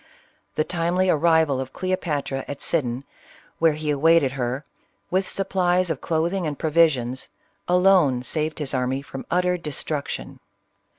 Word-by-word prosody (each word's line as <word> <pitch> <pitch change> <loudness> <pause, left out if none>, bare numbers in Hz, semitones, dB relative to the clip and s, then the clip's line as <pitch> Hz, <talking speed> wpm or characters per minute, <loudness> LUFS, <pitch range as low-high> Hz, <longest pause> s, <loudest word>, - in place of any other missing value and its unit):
The 155 - +2
timely 180 +2 +1
arrival 160 -3 +3
of 130 0 -7
Cleopatra 150 -7 -2
at 140 - -6
Sidon, 130 -5 -1 0.6
where 165 -1 +4
he 150 0 -2
awaited 150 -1 +4
her, 130 +2 -3 0.5
with 190 +1 +1
supplies 185 -2 +1
of 150 - -4
clothing 170 +2 0
and 145 -2 -4
provisions, 145 -6 +1 0.4
alone 180 -8 +4
saved 155 +4 -2
his 145 -3 -2
army 130 +1 -1
from 135 -1 -8
utter 180 0 +1
destruction. 150 -2 -4
155 Hz, 130 wpm, -23 LUFS, 135-175 Hz, 0.6 s, where